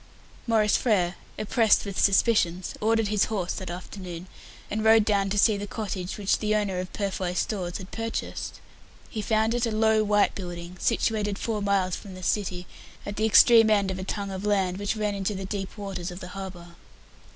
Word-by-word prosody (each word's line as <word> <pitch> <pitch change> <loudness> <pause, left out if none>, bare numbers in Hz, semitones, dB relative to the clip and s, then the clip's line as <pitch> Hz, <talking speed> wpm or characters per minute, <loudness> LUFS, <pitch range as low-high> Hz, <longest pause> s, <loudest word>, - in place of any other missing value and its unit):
Maurice 215 -2 +3
Frere, 185 -7 +1 0.2
oppressed 215 +1 +3
with 200 -2 -4
suspicions, 190 -3 +2
ordered 225 -1 +2
his 210 -1 +2
horse 190 -5 -2
that 185 - -6
afternoon, 180 -1 -7 0.5
and 215 +1 -1
rode 220 -1 +6
down 200 -2 +1
to 205 - -1
see 210 0 +4
the 205 +1 -5
cottage 195 -4 -4
which 200 -2 +1
the 215 0 +1
owner 200 -3 0
of 185 0 -5
"Purfoy 190 -3 -2
Stores" 180 -3 -2
had 190 -1 -10
purchased. 225 0 -4 0.5
He 220 - -3
found 220 +1 +1
it 240 0 +1
a - - -2
low 220 0 +3
white 205 -1 +3
building, 175 -1 -7
situated 210 -3 0
four 215 -1 -2
miles 195 -3 +1
from 195 -2 -10
the 185 - -10
city, 185 -2 -1 0.4
at 205 - -5
the 215 +1 +1
extreme 225 +1 +7
end 200 -3 +2
of 190 - -5
a - - -4
tongue 200 +1 -4
of 190 +1 -5
land 195 -3 +1
which 205 +1 -1
ran 210 -1 -1
into 200 +1 -2
the 190 0 -5
deep 195 +1 -5
waters 195 -3 -5
of 175 0 -8
the 180 - -8
harbour. 185 -3 -8
200 Hz, 195 wpm, -26 LUFS, 185-215 Hz, 0.5 s, extreme